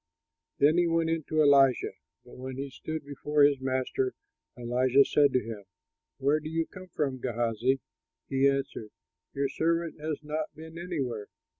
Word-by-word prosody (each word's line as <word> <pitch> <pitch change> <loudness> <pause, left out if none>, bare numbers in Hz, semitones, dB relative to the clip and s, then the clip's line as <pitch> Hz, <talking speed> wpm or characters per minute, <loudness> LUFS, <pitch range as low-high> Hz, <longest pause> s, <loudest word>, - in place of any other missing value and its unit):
Then 155 +4 +4
he 175 - +3
went 165 -1 +1
in 165 -3 -1
to 155 0 +2
Elisha; 135 -3 +5 0.3
but - - -14
when 130 0 -7
he 140 0 -5
stood 155 +2 -6
before 145 +1 +1
his 145 -2 +4
master, 130 0 -1 0.4
Elisha 125 +3 +3
said 145 -2 +4
to 125 - +2
him, 110 -2 -7 0.5
"Where 140 +3 +2
do 155 0 -7
you 165 0 0
come 185 +2 -12
from, 140 -6 -2
Gehazi?" 120 +2 0 0.5
He 135 0 +3
answered, 135 -5 -3 0.5
"Your 140 0 +1
servant 165 0 -1
has 155 -1 -2
not 150 +1 -2
been 160 +1 -10
anywhere." 135 - -3
140 Hz, 160 wpm, -29 LUFS, 130-155 Hz, 0.5 s, Elisha